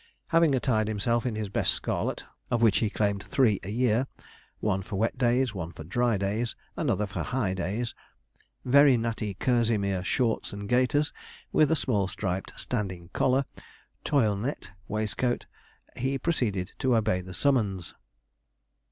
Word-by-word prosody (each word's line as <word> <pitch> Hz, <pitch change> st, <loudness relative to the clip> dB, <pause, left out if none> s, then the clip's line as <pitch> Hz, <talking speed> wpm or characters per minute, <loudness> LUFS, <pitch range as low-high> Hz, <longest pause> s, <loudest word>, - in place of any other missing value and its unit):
Having 165 Hz, -4 st, +4 dB
attired 115 Hz, -4 st, +1 dB
himself 115 Hz, +3 st, 0 dB
in 115 Hz, -, -2 dB
his 110 Hz, -1 st, -2 dB
best 95 Hz, -, +2 dB
scarlet, -, -, -2 dB, 0.3 s
of 120 Hz, -2 st, +1 dB
which 110 Hz, -4 st, +5 dB
he 110 Hz, -, +1 dB
claimed 100 Hz, -1 st, 0 dB
three 125 Hz, -7 st, +2 dB
a 95 Hz, -, -7 dB
year 120 Hz, +3 st, +2 dB, 0.5 s
one 95 Hz, -3 st, 0 dB
for 95 Hz, -, -6 dB
wet 110 Hz, +4 st, 0 dB
days, 125 Hz, -1 st, +2 dB
one 85 Hz, -4 st, -5 dB
for 80 Hz, -1 st, -9 dB
dry 120 Hz, +6 st, +1 dB
days, 105 Hz, +5 st, -1 dB, 0.2 s
another 110 Hz, -, 0 dB
for 100 Hz, -, -4 dB
high 120 Hz, -7 st, -1 dB
days 95 Hz, +6 st, -2 dB, 0.7 s
very 140 Hz, 0 st, +6 dB
natty 115 Hz, -3 st, -2 dB
kerseymere 110 Hz, -6 st, +1 dB
shorts 115 Hz, +3 st, 0 dB
and 100 Hz, 0 st, -6 dB
gaiters, 130 Hz, +6 st, +2 dB, 0.4 s
with 155 Hz, -, +4 dB
a 160 Hz, -, +3 dB
small 105 Hz, -10 st, +1 dB
striped, 95 Hz, -1 st, -3 dB
standing 95 Hz, -7 st, -3 dB
collar, 135 Hz, +1 st, +2 dB, 0.6 s
toilenette 110 Hz, -5 st, 0 dB, 0.2 s
waistcoat, 110 Hz, +3 st, -1 dB, 0.5 s
he 135 Hz, +2 st, -1 dB
proceeded 115 Hz, -, -1 dB
to 130 Hz, -2 st, +3 dB
obey 110 Hz, -4 st, +1 dB
the 90 Hz, 0 st, -9 dB
summons. 105 Hz, -10 st, +1 dB
110 Hz, 145 wpm, -28 LUFS, 100-125 Hz, 0.7 s, very